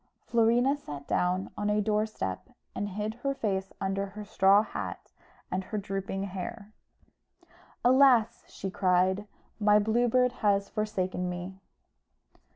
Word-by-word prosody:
Florina 240 +4 +3
sat 145 - -9
down 180 +1 0
on 205 0 -1
a 210 0 +2
door 210 +1 +1
step, 95 - -5 0.2
and 205 - -3
hid 210 +2 -3
her 275 +1 -1
face 195 -6 -2
under 195 +1 -1
her 210 +2 -9
straw 200 0 +4
hat - - -6 0.4
and 185 0 -2
her 215 - -4
drooping 195 -1 -3
hair. 200 +3 -6 1.1
"Alas!" 255 -3 +5
she 195 - -6
cried, 190 +1 +2 0.3
"my 210 -1 +5
Blue 220 +4 +2
Bird 250 +1 +3
has 200 -1 +2
forsaken 185 -4 -2
me." 180 +2 -6
205 Hz, 135 wpm, -29 LUFS, 190-220 Hz, 1.1 s, Alas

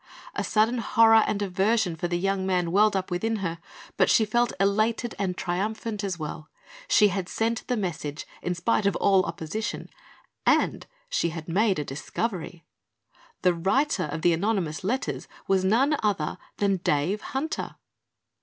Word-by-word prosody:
A - - -2
sudden 225 +3 +2
horror 225 -1 +5
and 205 -1 -1
aversion 195 0 +1
for 170 +2 -2
the 175 0 -1
young 195 +1 0
man 180 -3 0
welled 210 +2 +4
up 190 0 -2
within 225 +6 0
her, 170 -5 -3 0.4
but - - +4
she 220 - +5
felt 240 +3 +1
elated 215 +4 +1
and 190 -2 -1
triumphant, 210 +4 -2
as 190 -3 -2
well. 155 0 -6 0.4
She 210 - +5
had 190 -1 -3
sent 225 +1 -1
the 250 - 0
message 160 -6 -4 0.2
in 180 - -2
spite 200 +3 +1
of 200 - +1
all 195 -2 +4
opposition 210 +8 -4 0.5
and - - +2 0.2
she - - 0
had 160 -1 -7
made 195 +3 +2
a 150 - -2
discovery! 175 - -4 0.8
The 180 -1 +4
writer 190 - +1
of 150 +2 -5
the 175 - +5
anonymous 175 -4 -1
letters 245 +8 -2 0.2
was 190 -1 +2
none 250 +10 +3
other 200 -8 -1 0.2
than 200 -1 +2
Dave 175 +4 0
Hunter. 290 +3 -4
195 Hz, 160 wpm, -26 LUFS, 175-220 Hz, 0.8 s, horror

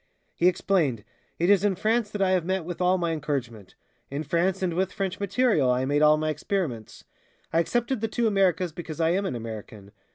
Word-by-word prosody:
He 175 - +2
explained, 170 - +1 0.3
"It 170 - +1
is 200 -2 +4
in 205 -2 +2
France 220 +3 0
that 205 -1 -1
I 185 - +2
have 185 -3 +2
met 185 -1 -2
with 175 +1 -6
all 180 +1 +3
my 170 -2 -1
encouragement; 135 - -4 0.3
in 140 +3 -3
France 175 +5 0
and 175 -2 0
with 185 +2 0
French 195 0 -3
material 200 - +2
I 125 +1 +1
made 145 +2 +1
all 150 0 +6
my 155 0 -1
experiments. 150 - -4 0.5
I 165 - +4
excepted 240 +6 0
the 225 - 0
two 235 +2 -1
Americas 185 -5 +2
because 165 -1 -8
I 165 0 +3
am 195 +2 0
an 130 - -3
American." 110 -3 -8
175 Hz, 205 wpm, -26 LUFS, 150-195 Hz, 0.5 s, all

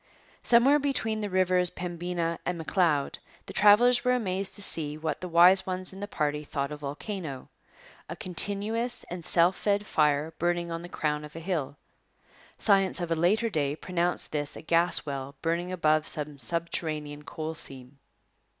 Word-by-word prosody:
Somewhere 260 +5 +5
between 225 -6 -1
the 205 - -3
rivers 185 -1 +3
Pembina 175 -1 -3
and 180 -1 -2
M'Leod 160 -4 0 0.3
the - - -9
travellers 240 +4 +5
were 250 - +3
amazed 195 -4 -2
to 205 - -2
see 150 -5 0
what 155 -2 -3
the 180 - -4
wise 180 +3 +6
ones 185 0 +1
in 190 - -10
the 205 - -5
party 150 -5 -2
thought 140 -1 -3
a - - -4
volcano 145 0 -6 0.6
a - - -5
continuous 205 +6 -1
and 175 -1 -5
self 175 +3 +3
fed 205 0 0
fire 150 -2 +1
burning 175 0 0
on 165 0 -4
the 175 - -9
crown 150 -3 -2
of 150 +1 -11
a - - -5
hill. 160 -5 -3 0.8
Science 195 -3 +3
of 175 -1 -4
a - - +5
later 195 +8 +2
day 145 -5 0
pronounced 175 +1 -1
this 145 -1 -3
a - - -9
gas 170 0 +2
well 140 -1 -5
burning 170 +2 -1
above 155 -3 +1
some 150 -2 -4
subterranean 155 0 -3
coal 155 +2 -5
seam. 135 -2 -3
170 Hz, 170 wpm, -28 LUFS, 150-190 Hz, 0.8 s, wise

